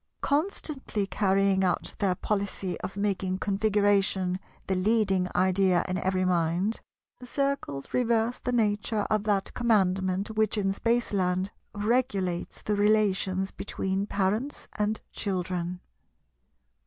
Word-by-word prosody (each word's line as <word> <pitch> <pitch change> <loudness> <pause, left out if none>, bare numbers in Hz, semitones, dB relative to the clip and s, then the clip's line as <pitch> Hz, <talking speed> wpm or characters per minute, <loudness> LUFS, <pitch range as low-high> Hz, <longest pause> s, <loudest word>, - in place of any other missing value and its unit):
Constantly 285 - -1
carrying 195 -1 +2
out 180 -2 0
their 190 -3 +2
policy 195 -2 -2
of 195 - -6
making 190 -2 0
Configuration 200 -2 +1 0.3
the 190 - 0
leading 195 -1 +2
idea 185 -1 +3
in 185 0 -1
every 185 0 +1
mind, 180 +4 +1 0.4
the 250 - -10
Circles 275 - -2
reverse 235 -1 +1
the 250 - -2
nature 210 -2 +1
of 215 -1 +1
that 200 -2 0
Commandment 195 -4 +1
which 215 0 +1
in 195 -2 +1
Spaceland 195 -4 0 0.2
regulates 205 -5 -1
the 210 - 0
relations 200 -2 +2
between 195 0 -2
parents 210 +9 -1
and 210 +1 +1
children. 180 -2 -2
200 Hz, 115 wpm, -28 LUFS, 185-215 Hz, 0.4 s, idea